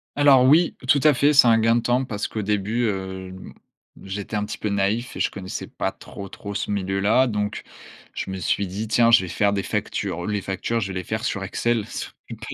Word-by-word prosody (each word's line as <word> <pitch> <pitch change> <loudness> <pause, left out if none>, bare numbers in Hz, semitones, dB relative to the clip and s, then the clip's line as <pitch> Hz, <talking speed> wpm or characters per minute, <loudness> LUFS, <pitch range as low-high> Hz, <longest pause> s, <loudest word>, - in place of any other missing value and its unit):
Alors, 140 -3 +6
oui, 155 +6 +4
tout 140 +3 +5
à 150 -2 +6
fait, 145 +3 +3
c'est 140 -4 +7
un 115 -1 +6
gain 115 +1 +3
de - - +1
temps 125 +3 +1
parce 105 -4 -3
qu'au 110 - -4
début, 105 +3 0
heu, 95 -2 -4 0.7
j'étais 100 +2 -5
un 105 0 0
petit 105 - -7
peu 105 - -2
naïf 100 +5 -1
et - - -6
je - - +1
connaissais 95 -2 -6
pas - - -3
trop, 100 -1 -10
trop 100 0 -8
ce 100 - -3
milieu-là. 100 +5 +2
Donc 105 -4 -2 0.5
je - - -5
me 95 - -4
suis 100 +2 0
dit: 100 +5 -4
«Tiens, 115 +2 +4
je 115 -3 +7
vais - - -5
faire 100 +3 +1
des 100 -1 -1
factures, 85 0 -3
les 105 -1 -1
factures, 100 +4 -2
je 100 - -3
vais 95 - -3
les - - -5
faire 110 +4 -4
sur 100 -6 -2
Excel». 115 +3 -1
Sauf - - -6
que - - -7
pas - - -10
105 Hz, 235 wpm, -23 LUFS, 95-120 Hz, 0.7 s, c'est